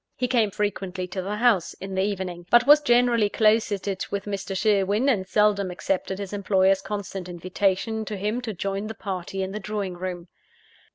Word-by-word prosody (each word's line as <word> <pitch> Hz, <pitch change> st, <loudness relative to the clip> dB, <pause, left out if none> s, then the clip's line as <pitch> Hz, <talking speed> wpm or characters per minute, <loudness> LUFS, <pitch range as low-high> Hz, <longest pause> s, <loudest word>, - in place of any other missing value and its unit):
He 250 Hz, -, 0 dB
came 235 Hz, -4 st, +2 dB
frequently 190 Hz, -2 st, -3 dB
to 185 Hz, +1 st, -3 dB
the 200 Hz, +3 st, -3 dB
house, 215 Hz, -6 st, +2 dB
in 195 Hz, 0 st, -7 dB
the 190 Hz, -, +1 dB
evening; 185 Hz, -3 st, -3 dB
but 240 Hz, +1 st, +6 dB
was 295 Hz, +2 st, +7 dB
generally 240 Hz, -5 st, +3 dB
closeted 205 Hz, -3 st, +1 dB
with 200 Hz, -1 st, -3 dB
Mr. 195 Hz, -1 st, -4 dB
Sherwin, 205 Hz, +4 st, +2 dB
and 200 Hz, -9 st, +1 dB
seldom 205 Hz, -2 st, +2 dB
accepted 185 Hz, +1 st, -2 dB
his 200 Hz, 0 st, -6 dB
employer's 195 Hz, -1 st, +2 dB
constant 195 Hz, -2 st, -5 dB
invitation 190 Hz, +5 st, -1 dB
to 210 Hz, 0 st, -5 dB
him 210 Hz, +5 st, -2 dB
to 240 Hz, -3 st, -4 dB
join 195 Hz, +3 st, -3 dB
the 220 Hz, -, -6 dB
party 190 Hz, -1 st, -4 dB
in 190 Hz, -, -4 dB
the 210 Hz, -, -4 dB
drawing 205 Hz, -2 st, -3 dB
room. 175 Hz, -1 st, -6 dB
200 Hz, 180 wpm, -25 LUFS, 190-215 Hz, -, was